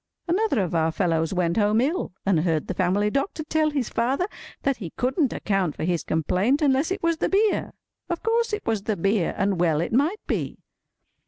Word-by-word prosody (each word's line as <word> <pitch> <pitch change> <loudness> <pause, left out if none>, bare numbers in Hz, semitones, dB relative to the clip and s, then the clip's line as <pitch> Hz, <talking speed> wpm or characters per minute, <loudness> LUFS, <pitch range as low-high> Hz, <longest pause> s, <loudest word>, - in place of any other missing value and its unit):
Another 350 - +1
of 175 - -4
our 160 -1 +2
fellows 165 -2 0
went 180 -1 0
home 210 +1 +3
ill, 300 +9 0
and 195 -5 +3
heard 160 -2 0
the - - -3
family 190 +4 +1
doctor 295 - -1
tell 310 0 +1
his 280 -6 -1
father 260 +9 0 0.4
that 275 -2 +1
he 180 -7 -6
couldn't 260 +2 +1
account 195 -7 -1
for - - -5
his 175 0 0
complaint 185 - +1
unless 280 0 +2
it 380 0 -3
was 335 -1 +2
the - - 0
beer. 415 +2 +1 0.4
Of 345 -1 -3
course 460 +1 +1
it 420 0 -3
was 220 -3 0
the 210 0 -2
beer, 195 0 +1
and 195 -2 0
well 165 -3 +2
it 170 - -2
might 305 - +1
be! - - -2
220 Hz, 200 wpm, -24 LUFS, -, 0.4 s, home